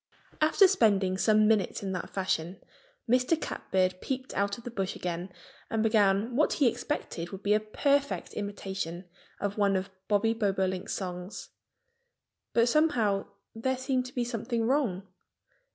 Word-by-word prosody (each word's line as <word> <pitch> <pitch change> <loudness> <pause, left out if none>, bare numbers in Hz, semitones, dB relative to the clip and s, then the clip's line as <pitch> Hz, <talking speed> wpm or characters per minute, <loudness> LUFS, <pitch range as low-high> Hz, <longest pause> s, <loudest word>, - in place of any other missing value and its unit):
After 320 +6 +6
spending 205 - +3
some 215 +2 +4
minutes 210 -2 +1
in 195 - -2
that 180 -2 -4
fashion 185 -2 -2 0.5
Mr. 250 +7 +3
Catbird 185 -8 -1
peeped 260 0 -4
out 200 0 0
of 235 - -12
his 245 - -7
bush 195 -3 -2
again 175 +1 -4 0.4
and 225 -1 0
began 215 +1 +3
what 305 - +3
he 280 - +3
expected 215 - -3
would 195 +1 -9
be 205 - +3
a 210 - +4
perfect 280 +6 0
imitation 195 -4 -4 0.3
of 205 +1 -3
one 200 -1 +3
of 190 +1 -2 0.2
Bobby 215 +2 +2
Bobolink's 190 -4 -1
songs. 180 0 -6 1.0
But 235 0 +3
somehow 235 -9 +2 0.3
there 260 +3 -1
seemed 260 -1 -1
to 250 - -13
be 245 - +1
something 235 0 -2
wrong. 235 -8 +1
210 Hz, 150 wpm, -29 LUFS, 190-245 Hz, 1.0 s, After